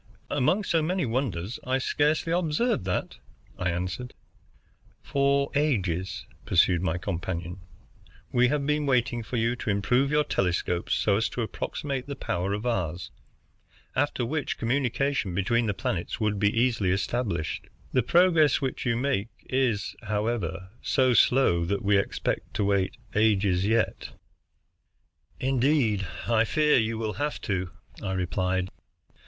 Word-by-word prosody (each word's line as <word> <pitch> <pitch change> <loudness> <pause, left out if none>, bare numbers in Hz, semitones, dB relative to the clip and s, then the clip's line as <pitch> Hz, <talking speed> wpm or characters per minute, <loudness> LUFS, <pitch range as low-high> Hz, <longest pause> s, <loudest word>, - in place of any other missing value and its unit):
"Among 145 +9 +2
so 165 -4 +1
many 180 +2 0
wonders 115 -5 -2
I 130 +1 +1
scarcely 150 +4 +1
observed 175 - +1
that," 90 - -2 0.4
I 90 - 0
answered. 90 +8 -4 0.9
"For 140 0 +1
ages," 95 - 0 0.2
pursued 90 -1 +3
my 90 -2 0
companion, 90 -1 -4 0.7
"we 125 0 +4
have 140 +1 0
been 150 0 0
waiting 120 -2 +1
for 115 +3 -4
you 115 +2 +1
to 110 - -4
improve 125 +7 +2
your 150 +1 +3
telescopes 90 -5 0
so 100 -2 +2
as 110 - 0
to 120 - -3
approximate 135 +4 -4
the 140 - -4
power 95 -7 -2
of 105 +3 -3
ours, 90 -7 -2 0.8
after 130 -2 0
which 145 +3 -2
communication 130 -4 0
between 115 +5 +1
the - - +2
planets 85 +4 -3
would 105 -2 0
be 105 0 +4
easily 115 -4 +1
established. 95 -3 -1 0.3
The - - +4
progress 170 -5 +4
which 130 -1 -3
you 115 -1 +2
make 125 -5 0 0.2
is, 125 -6 0
however, 105 -4 -2
so 130 -2 +2
slow 120 -9 +4
that 100 +3 -1
we 100 0 +3
expect 100 - -1
to - - +1
wait 100 -2 +1 0.2
ages 100 -3 +2
yet." 110 0 0 1.3
"Indeed, 130 - +2 0.2
I 115 -2 +4
fear 150 +5 +3
you 110 0 -1
will 110 -1 -2
have 150 0 -1
to," 95 -2 -2 0.3
I 95 - -2
replied. 95 +1 -1
115 Hz, 140 wpm, -27 LUFS, 95-135 Hz, 1.3 s, we